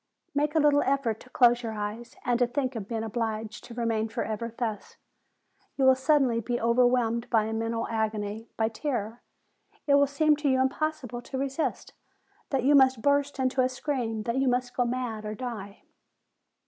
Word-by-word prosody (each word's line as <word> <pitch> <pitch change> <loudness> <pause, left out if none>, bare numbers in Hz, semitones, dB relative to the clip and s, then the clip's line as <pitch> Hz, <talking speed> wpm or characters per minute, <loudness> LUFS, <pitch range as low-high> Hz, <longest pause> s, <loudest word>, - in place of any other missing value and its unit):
Make 295 +2 0
a - - +5
little 290 -1 +4
effort 260 -5 0
to 255 - -16
close 240 -1 +4
your 225 -2 -4
eyes, 215 +3 -5
and 245 -1 +1
to 245 - +3
think 255 0 -2
of 210 -4 -5
being 225 -1 -3
obliged 220 -1 -3
to 235 - -10
remain 225 -2 -1
forever 225 +1 -3
thus; 225 -4 -4 0.8
you 270 - +3
will 260 - +8
suddenly 260 -3 +2
be 240 +2 -2
overwhelmed 235 0 +2
by 225 -3 +3
a 220 +1 -3
mental 230 +1 -2
agony, 220 0 -3
by 220 - +2
terror; 230 -1 -3 0.6
it 285 - +3
will 285 0 +5
seem 300 +2 +3
to 295 -1 0
you 260 -1 +3
impossible 265 -2 -1
to 265 - -6
resist, 275 +3 -2 0.6
that 270 -3 0
you 280 +3 +4
must 260 -4 +5
burst 285 0 +2
into 260 0 +1
a 255 - +2
scream, 250 -5 -3
that 235 +3 -2
you 270 0 +2
must 250 0 0
go 245 - +2
mad 240 -3 -3
or 215 0 -4
die. 210 -5 -7
245 Hz, 185 wpm, -27 LUFS, 225-265 Hz, 0.8 s, will